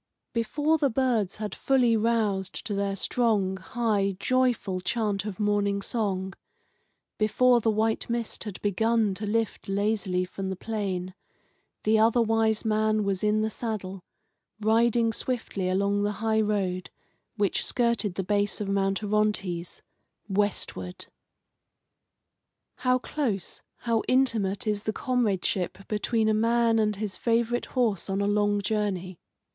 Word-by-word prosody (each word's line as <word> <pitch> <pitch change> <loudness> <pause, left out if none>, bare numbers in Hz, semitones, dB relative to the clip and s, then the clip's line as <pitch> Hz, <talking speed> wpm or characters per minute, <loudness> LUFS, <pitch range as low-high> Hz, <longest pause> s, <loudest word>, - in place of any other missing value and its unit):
Before 295 +7 +1
the 285 -2 +3
birds 230 -6 +1
had 210 -1 -5
fully 250 -4 +2
roused 215 -4 0
to 210 - -3
their 200 0 -1
strong, 200 -3 +1
high, 200 -1 -1
joyful 245 -8 +1
chant 205 0 -1
of 210 -2 -5
morning 205 -1 +1
song, 195 -3 -2 0.9
before 240 +3 +4
the 225 - +2
white 220 +2 0
mist 235 -1 -3
had 205 -3 -6
begun 220 +1 +2
to 205 +3 -4
lift 225 -1 -1
lazily 200 -2 0
from 190 +1 -5
the 190 - -2
plain, 190 -3 -3 0.7
the 215 +1 +3
Other 225 +2 +4
Wise 225 -1 +2
Man 215 0 +2
was 195 0 -1
in 210 0 +2
the 220 - 0
saddle, 195 -5 -5 0.6
riding 230 +1 +3
swiftly 225 -8 -2
along 200 +2 +1
the 205 0 0
high 220 +1 +1
road, 195 -4 -1 0.5
which 200 -3 +1
skirted 235 -6 +1
the 190 - -2
base 205 +2 0
of 210 - -3
Mount 195 +1 0
Orontes, 200 -5 -1 0.4
westward. 190 - -1 1.7
How 255 0 +2
close, 245 - -3 0.2
how 230 -2 +1
intimate 230 -7 +1
is 210 -1 0
the 215 +1 -2
comradeship 195 -7 -1
between 220 +1 0
a 215 - +3
man 230 +1 +3
and 210 -1 +1
his 200 -1 -4
favourite 235 +1 +1
horse 215 -7 +1
on 195 0 0
a 200 - +1
long 205 0 +1
journey. 195 -4 -2
210 Hz, 135 wpm, -27 LUFS, 195-230 Hz, 1.7 s, before